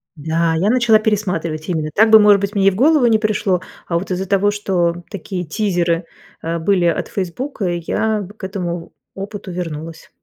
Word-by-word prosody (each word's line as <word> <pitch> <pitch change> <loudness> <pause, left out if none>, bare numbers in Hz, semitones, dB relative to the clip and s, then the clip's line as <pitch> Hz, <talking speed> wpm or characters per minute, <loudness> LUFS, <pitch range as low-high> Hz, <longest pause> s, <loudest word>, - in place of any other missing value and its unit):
Да, 160 +2 0
я 185 +6 +1
начала 240 -3 +4
пересматривать, 180 -7 -2
именно 155 -3 -1
так 220 +5 +4
бы, 220 0 +9
может 205 -1 +5
быть, 200 +1 -3
мне 195 -1 +3
и - - +6
в - - -6
голову 285 +4 +4
не 225 -2 +4
пришло. 210 -4 0 0.3
А 170 - 0
вот 190 - -8
из-за 185 +1 -2
того, 200 +1 +2
что 175 -4 -1
такие 185 -2 -5
тизеры, 175 -1 0 0.4
э, 165 +1 -2
были 180 +1 +2
от 170 - 0
"Фейсбука", 200 +5 -4
я 190 +5 -1
в 190 - -8
к 215 - -19
этому 175 -3 -4 0.2
опыту 195 0 -7
вернулась. 165 -2 -6
190 Hz, 190 wpm, -18 LUFS, 170-210 Hz, 0.4 s, бы